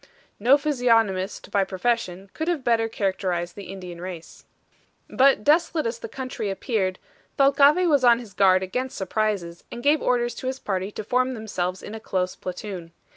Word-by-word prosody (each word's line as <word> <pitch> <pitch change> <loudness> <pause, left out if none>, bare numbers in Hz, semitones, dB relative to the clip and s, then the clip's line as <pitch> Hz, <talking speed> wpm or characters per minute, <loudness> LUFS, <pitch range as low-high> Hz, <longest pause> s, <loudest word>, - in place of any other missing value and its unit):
No 250 +7 +5
physiognomist 230 -9 +1
by 200 - +3
profession 190 -1 -2
could 315 - -4
have 335 -6 0
better 225 -2 +2
characterized 185 -4 -2
the 200 - -8
Indian 180 -3 -8
race. 180 -2 -9 0.6
But 265 -5 +3
desolate 315 +2 +2
as 230 0 -2
the - - -7
country 255 -4 -4
appeared, 195 -2 -1 0.4
Thalcave 280 +6 +5
was 285 -5 +3
on 240 -1 +6
his 230 -5 -10
guard 185 0 +4
against 250 +7 -3
surprises, 190 -3 -2
and 240 - -7
gave 295 +1 +3
orders 240 -1 +1
to 255 - -4
his 260 0 -2
party 190 -5 -3
to 215 - -5
form 255 +3 +1
themselves 185 -5 -3
in 210 - -8
a 220 - -6
close 185 -4 -2
platoon. 180 -2 -7
215 Hz, 170 wpm, -24 LUFS, 185-255 Hz, 0.6 s, on